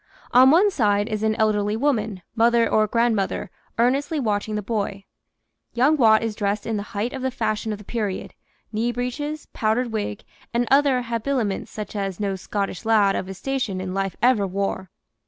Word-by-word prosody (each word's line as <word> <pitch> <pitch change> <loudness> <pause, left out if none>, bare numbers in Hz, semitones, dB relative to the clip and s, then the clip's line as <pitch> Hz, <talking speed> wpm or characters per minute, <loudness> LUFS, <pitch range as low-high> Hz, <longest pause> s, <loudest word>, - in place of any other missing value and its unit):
On 255 +2 +7
one 370 +8 +5
side 205 - +2
is 215 -1 -2
an 220 0 +1
elderly 210 -1 +1
woman 220 -8 0
(mother 230 0 +4
or 215 -1 +3
grandmother) 220 -4 0 0.3
earnestly 275 +6 +1
watching 215 -3 -1
the 210 - -2
boy. 200 -2 -3 0.7
Young 265 +6 +4
Watt 225 -5 +5
is 225 -1 -1
dressed 205 0 -2
in 225 - -1
the 205 - -1 0.2
height 225 +5 -1
of 265 - -5
the 260 - 0
fashion 215 -3 -2
of 210 - -3
the 210 - -12
period 210 -5 -3 0.4
knee 230 +3 0
breeches, 290 +6 -4
powdered 230 +2 0
wig, 205 - -3 0.3
and 240 0 +1
other 275 -2 +4
habiliments 230 -2 -2
such 210 -1 -7
as 195 -2 -3
no 200 -2 -1
Scottish 195 0 -3
lad 215 -3 +3
of 185 - -3
his 190 -1 -7
station 255 -8 -2
in 185 0 -4
life 195 -1 -2
ever 235 -5 +4
wore. 190 -1 -3
220 Hz, 180 wpm, -23 LUFS, 205-245 Hz, 0.7 s, On